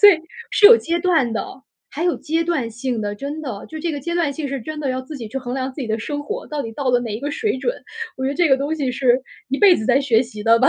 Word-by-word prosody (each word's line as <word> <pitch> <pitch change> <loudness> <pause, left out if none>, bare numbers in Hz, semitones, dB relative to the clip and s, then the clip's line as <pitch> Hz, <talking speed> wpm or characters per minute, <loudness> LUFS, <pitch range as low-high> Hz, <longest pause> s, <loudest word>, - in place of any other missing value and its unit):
所 415 - +10
以 370 -5 +6 0.3
是 - - +2
有 460 +2 +10
阶 335 +1 -1
段 325 -10 +2
的， - - -2 0.4
还 305 - -4
有 355 - +2
阶 325 +2 -1
段 305 -9 -1
性 240 0 -3
的， 205 0 -2
真 285 +8 -5
的。 240 -9 -6
就 315 - -7
这 330 +1 -2
个 290 - -4
阶 340 +5 -3
段 335 -5 +1
性 285 0 -4
是 275 - -3
真 310 +2 -5
的 285 - -2
要 260 0 -1
自 290 +4 -8
己 230 -3 -6
去 245 - -7
衡 245 -2 -5
量 265 0 -2
自 275 - -5
己 240 - -3
的 220 +1 -1
生 290 +5 -4
活， 435 +11 -5
到 295 -2 -3
底 225 - -6
到 270 +2 -2
了 245 - +4
哪 230 -3 -4
一 215 - -5
个 290 +2 -2
水 425 -2 -1
准， 485 - -1 0.4
我 260 - -3
觉 - - +1
得 - - -3
这 340 +1 +3
个 270 - +5
东 285 +4 -1
西 280 -5 -1
是 250 0 +2 0.3
一 275 - 0
辈 390 -4 +7
子 220 - -4
在 260 +3 +4
学 245 -4 +3
习 230 -4 -8
的 230 +1 +5
吧。 260 +3 +5
275 Hz, 335 characters per minute, -21 LUFS, 245-315 Hz, 0.4 s, 所